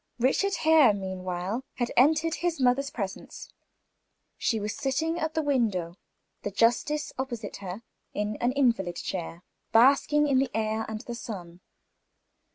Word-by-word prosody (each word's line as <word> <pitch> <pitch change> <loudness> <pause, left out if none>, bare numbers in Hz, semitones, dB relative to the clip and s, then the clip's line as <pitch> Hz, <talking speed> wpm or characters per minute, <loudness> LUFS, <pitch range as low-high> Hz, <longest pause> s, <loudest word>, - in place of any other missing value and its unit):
Richard 270 +11 +2
Hare, 310 -9 +6
meanwhile, 190 +3 -4
had 240 -1 -2
entered 310 +5 +4
his 345 -2 -1
mother's 260 +2 +2
presence. 195 -5 -6 0.8
She 225 - 0
was 210 0 -3
sitting 285 +5 -1
at 315 -1 -2
the 320 - +2
open 295 - -7
window, 185 -9 0 0.5
the - - -3
justice 245 +8 +1
opposite 240 -6 -4
to - - -9
her, 190 +2 -6 0.3
in 210 +1 -2
an 240 - +1
invalid 230 -10 +1
chair, 175 -1 -5 0.3
basking 280 +5 +5
in 270 -2 +3
the 270 -1 +1
air 220 0 -1
and 215 -1 -5
the 240 - -7
sun. 180 -7 -8
240 Hz, 150 wpm, -27 LUFS, 200-280 Hz, 0.8 s, Hare